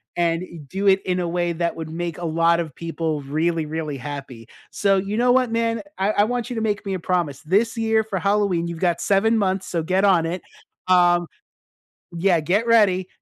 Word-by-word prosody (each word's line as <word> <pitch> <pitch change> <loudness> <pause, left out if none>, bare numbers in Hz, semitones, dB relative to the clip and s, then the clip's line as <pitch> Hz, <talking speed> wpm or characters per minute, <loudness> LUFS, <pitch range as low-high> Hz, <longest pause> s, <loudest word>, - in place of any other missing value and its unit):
and 170 0 0 0.2
do 195 +7 -2
it 195 0 +5
in 180 -1 0
a 175 - -1
way 175 0 -1
that 170 +1 -2
would 160 -1 -6
make 170 0 -4
a 175 - -5
lot 165 +1 +2
of 160 -5 -4
people 165 -2 -3
really, 160 +3 -1
really 155 -2 -4
happy, 135 -5 -8 0.2
so 195 -1 +2
you 195 +2 -2
know 245 +1 +3
what, 255 -2 +2
man, 230 -1 0 0.2
I 195 +2 +2
I 205 -1 +3
want 245 +1 -3
you 245 - -4
to 225 - -2
make 210 -2 -1
me 195 - -1
a - - -4
promise 170 -6 -1
this 210 +9 +1
year 220 -1 +2
for 210 -3 -4
Halloween 195 -3 +1
you've 170 -1 -6
got 175 -2 +1
7 220 +3 +2
months, 190 -2 0
so 170 -2 -2
get 185 +4 +1
on 180 -5 +4
it, 175 +2 -3 0.5
um 175 -1 +4 0.9
Yeah, 170 0 +2
get 185 +9 0
ready. 195 -5 +4
180 Hz, 210 wpm, -22 LUFS, 165-205 Hz, 0.9 s, it